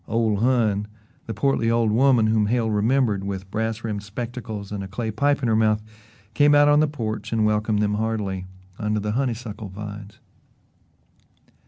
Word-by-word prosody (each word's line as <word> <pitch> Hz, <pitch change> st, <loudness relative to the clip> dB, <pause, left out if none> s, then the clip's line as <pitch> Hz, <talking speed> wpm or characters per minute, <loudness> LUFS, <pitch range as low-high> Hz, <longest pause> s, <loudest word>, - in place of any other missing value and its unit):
"Ole 110 Hz, -2 st, +1 dB
Hon," 110 Hz, -3 st, +1 dB, 0.4 s
the 110 Hz, -, -3 dB
portly 115 Hz, 0 st, +1 dB
old 115 Hz, -2 st, +2 dB
woman 125 Hz, 0 st, +4 dB
whom 110 Hz, -1 st, +2 dB
Hale 115 Hz, 0 st, +1 dB
remembered, 105 Hz, -1 st, +1 dB
with 95 Hz, -1 st, -5 dB
brass 110 Hz, +1 st, -2 dB
rimmed 105 Hz, -3 st, -3 dB
spectacles 110 Hz, -1 st, -6 dB
and 100 Hz, -1 st, -4 dB
a -, -, -6 dB
clay 110 Hz, +3 st, -4 dB
pipe 140 Hz, +5 st, +1 dB
in -, -, +2 dB
her 110 Hz, -, +2 dB
mouth, 110 Hz, -1 st, +2 dB, 0.5 s
came 145 Hz, +5 st, +5 dB
out 145 Hz, 0 st, +6 dB
on 145 Hz, 0 st, +5 dB
the 155 Hz, -, +3 dB
porch 115 Hz, -7 st, -4 dB
and 110 Hz, -2 st, +2 dB
welcomed 105 Hz, 0 st, +1 dB
them 105 Hz, 0 st, +1 dB
heartily 105 Hz, -4 st, -2 dB, 0.3 s
under 105 Hz, 0 st, 0 dB
the 105 Hz, +1 st, -2 dB
honeysuckle 115 Hz, -4 st, -3 dB
vines. 105 Hz, +1 st, -8 dB
110 Hz, 170 wpm, -23 LUFS, 105-120 Hz, 0.5 s, out